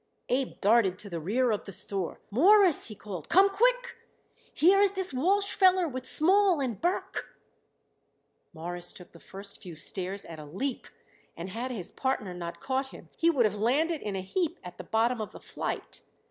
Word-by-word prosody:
Abe 260 +1 -1
darted 205 -3 +4
to 200 0 -6
the 170 - -3
rear 230 +9 +1
of 210 - -2
the 195 - -7
store. 190 -1 -2
"Mawruss," 370 - +5
he 215 - -8
called, 190 -6 -8
"come 385 +3 +6
quick! - - +1 0.5
Here 375 +5 +4
is 400 -1 +4
this 380 -5 -2
Walsh 390 +10 +2
feller 370 -2 +4
with 260 -3 -6
Small 370 +3 +3
and 250 -6 -3
Burke." 350 +2 -2 1.1
Morris 175 +2 -3
took 180 - -13
the 170 - -15
first 200 +3 -7
few 180 -6 -9
stairs 185 +5 -2
at 165 -2 -9
a 150 - -9
leap, 235 - -4 0.5
and 170 +3 -6
had 235 +6 -4
his 210 -9 -5
partner 215 -8 -2
not 170 -1 -6
caught 265 0 -1
him - - -13
he 335 - +3
would 270 -8 +3
have 210 -1 0
landed 295 +8 +1
in 205 -2 -4
a 190 - -2
heap 335 - -2
at 180 -1 -10
the - - -5
bottom 230 +1 +1
of 215 - -6
the - - -10
flight. - - -5
240 Hz, 190 wpm, -29 LUFS, -, 1.1 s, come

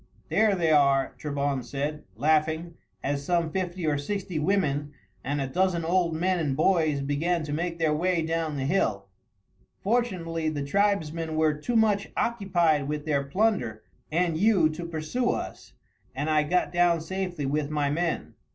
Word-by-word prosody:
"There 215 -2 +3
they 165 -3 +1
are," 140 -2 +3
Trebon 140 -2 -1
said, 145 +5 -3
laughing, 155 +5 +1 0.3
as 140 0 -1
some 170 0 0
fifty 180 -1 -3
or 145 -2 +1
sixty 185 +1 -3
women 150 -5 0 0.3
and 145 +2 -1
a 135 - 0
dozen 175 +3 0
old 170 -1 +1
men 180 +2 +1
and 140 -5 -1
boys 155 -4 +2
began 155 +5 0
to 150 -1 -4
make 170 +2 -2
their 160 -2 +2
way 170 +1 +1
down 160 -1 -1
the 135 - -2
hill. 110 - 0 0.8
"Fortunately 180 -8 0
the 145 -2 -3
tribesmen 165 -3 0
were 155 -1 +3
too 150 +11 -3
much 210 -3 +3
occupied 175 -10 +1
with 150 0 -3
their 145 -3 +1
plunder 140 - 0 0.3
and 165 0 +1
you 195 -6 +4
to 170 +2 -6
pursue 170 +10 -1
us, - - -4 0.4
and 145 +4 -1
I 155 0 +4
got 180 +4 0
down 175 -1 +3
safely 180 -2 -3
with 145 +1 -1
my 145 -2 0
men. 170 +2 -2
160 Hz, 160 wpm, -27 LUFS, 145-180 Hz, 0.8 s, you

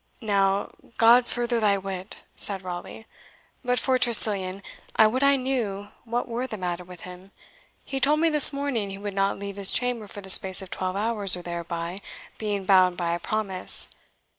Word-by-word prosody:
"Now, 200 -1 -1 0.3
God 235 +2 +4
further 240 -1 -2
thy 205 -2 +1
wit," 190 0 -8
said 195 -2 -4
Raleigh. 180 +4 -9 0.6
"But 250 0 -1
for 260 0 0
Tressilian, 200 -5 +4 0.3
I 220 - +5
would 245 +5 -1
I 280 0 +4
knew 235 -7 -4 0.2
what 240 +2 -4
were 240 +2 -5
the 215 - -8
matter 180 -1 -5
with 180 -1 -14
him. 180 +1 -13 0.6
He 270 - -5
told 295 +3 +1
me 330 - +2
this 300 -2 +9
morning 275 -8 -4
he 195 - -8
would 205 0 -7
not 195 0 -1
leave 200 0 -8
his 200 -1 -2
chamber 245 -3 -2
for 205 - -10
the 190 -1 0
space 190 -2 +7
of 190 -2 -8
twelve 185 0 -4
hours 205 -2 0
or 175 - -10
thereby, 170 +1 -6 0.4
being 205 -3 -4
bound 185 -2 +3
by 170 -1 -2
a 170 - -4
promise. 195 -1 +1
200 Hz, 185 wpm, -24 LUFS, 185-235 Hz, 0.6 s, this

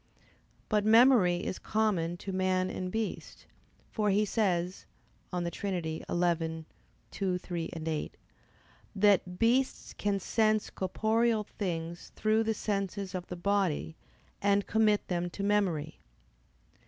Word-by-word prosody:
But 210 -2 +2
memory 220 -5 +5
is - - -3
common 190 -6 0
to 195 - -3
man 185 0 +1
and 185 0 -4
beast, 220 +1 -4 0.5
for 210 -2 0
he 205 +2 +3
says 185 -4 -1 0.4
(De 175 -1 -2
Trin. 195 +2 -3
xii, 160 0 -1 0.5
2, 185 -2 -1
3, 175 -2 -4
8) 160 -2 -4 0.8
that 195 -3 +3
"beasts 250 +5 +1
can 200 -1 -1
sense 215 +2 +1
corporeal 220 +4 +1
things 170 -5 -5
through 215 +1 +2
the 220 0 0
senses 200 -2 -2
of 180 -1 -4
the 180 - -5
body, 180 -4 0 0.5
and 200 0 +2
commit 215 -1 +2
them 175 -1 -1
to 200 - -6
memory." 185 -7 0
195 Hz, 120 wpm, -30 LUFS, 175-215 Hz, 0.8 s, memory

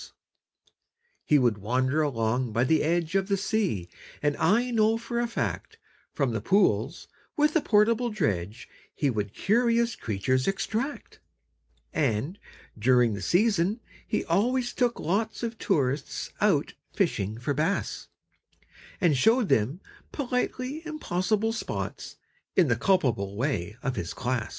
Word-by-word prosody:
He 150 - +4
would 120 -6 +2
wander 130 +8 +1
along 120 -4 0
by 115 - +2
the 155 +5 +3
edge 165 +1 0
Of 195 -1 +1
the 200 -1 +1
sea, 195 - -1 0.4
and 145 0 +2
I 235 +8 +2
know 225 -1 +3
for 235 +1 -3
a 240 - 0
fact 230 - -3 0.3
From 140 -4 0
the 110 -2 -2
pools 195 - +1 0.3
with 300 +1 +3
a 320 - +4
portable 230 +2 +3
dredge 110 - -2 0.3
He 145 -3 +1
would 105 -3 -2
curious 235 - +2
creatures 130 - -1
extract: 220 +8 -3 0.7
And, 140 - -1 0.4
during 120 0 +4
the 100 - -5
season, 200 - +2 0.3
he - - -1
always 240 +8 +1
took 245 -2 0
lots 215 +8 -1
Of 230 -1 -4
tourists 140 - -1
out - - +2 0.2
fishing 100 +3 -1
for 125 +5 -2
bass, 160 +8 -1 0.9
And 170 -6 +3
showed 225 - +3
them 130 - +1 0.3
politely 255 +1 -2
impossible 220 - -1
spots, 225 - -5 0.4
In 175 -7 +4
the 120 - +3
culpable 115 - +1
way 110 - -2
of 135 -2 -1
his 85 - -4
class. 125 -3 -2
170 Hz, 135 wpm, -27 LUFS, -, 0.9 s, He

